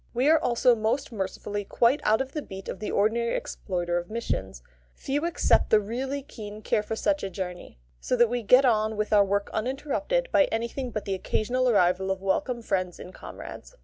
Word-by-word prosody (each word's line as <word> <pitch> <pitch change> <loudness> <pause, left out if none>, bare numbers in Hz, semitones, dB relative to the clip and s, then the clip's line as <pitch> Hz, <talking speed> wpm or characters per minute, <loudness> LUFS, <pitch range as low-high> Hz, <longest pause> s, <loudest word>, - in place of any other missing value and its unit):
We 255 +4 +2
are 320 - +5
also 245 0 +3
most 235 +6 -1
mercifully 205 0 -4
quite 235 +7 +2
out 220 +3 +3
of 265 0 -4
the 300 - -3
beat 190 -6 -9
of - - -5
the 215 - -4
ordinary 230 +3 +1
exploiter 175 -2 -2
of 175 - -9
missions; 95 - -4 0.3
few 290 +4 -2
except 345 - +2
the 215 - +6
really 260 +7 -3
keen 215 -6 -9
care 210 - +1
for 220 +1 -4
such 295 +6 0
a 195 - -3
journey; 180 - -6 0.2
so - - -1
that 240 -1 +5
we 245 +1 -2
get 250 +5 +6
on 220 -2 +2
with 215 0 -1
our 205 -1 +7
work 200 +1 -1
uninterrupted 290 - -1
by 290 - +5
anything 235 +3 -3
but 215 -3 -4
the 195 - -1
occasional 245 +6 0
arrival 190 -3 +3
of 190 0 -1
welcome 235 +5 -1
friends 185 -4 -1
and 180 - -10
comrades. - - -10
220 Hz, 200 wpm, -27 LUFS, 195-255 Hz, 0.3 s, our